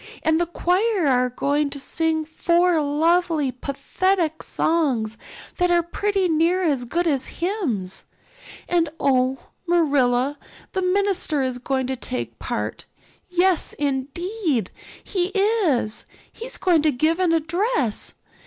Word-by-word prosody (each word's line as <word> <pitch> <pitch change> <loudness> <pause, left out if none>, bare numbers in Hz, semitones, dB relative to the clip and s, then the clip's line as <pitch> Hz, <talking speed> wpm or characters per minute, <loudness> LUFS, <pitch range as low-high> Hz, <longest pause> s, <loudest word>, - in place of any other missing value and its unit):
And 320 0 +3
the 345 - 0
choir 365 +3 +1
are 250 -2 +3
going 285 +4 0
to 280 - -5
sing 320 +2 -1
four 340 +1 +2
lovely 315 0 +2
pathetic 320 +6 -1
songs 260 -10 0 0.4
that 355 0 +2
are 345 -1 +3
pretty 390 +2 0
near 335 +3 +2
as 280 -7 +1
good 340 +8 -1
as 280 -6 0
hymns. 315 - -2 0.6
And 340 -3 +2
oh, 260 -1 +2 0.3
Marilla, 285 -5 +2 0.3
the 380 - -1
minister 365 -6 +1
is 255 -1 -2
going 260 +1 -1
to 260 +1 -2
take 255 0 -5
part; - - -4 0.4
yes, 360 -1 +2
indeed, 290 - -2 0.3
he 360 -3 -1
is; 390 - +1 0.3
he's 485 +2 -5
going 345 -5 +3
to 305 0 +3
give 310 +6 +1
an 360 -3 +3
address. 330 - 0
320 Hz, 125 wpm, -23 LUFS, 270-360 Hz, 0.6 s, And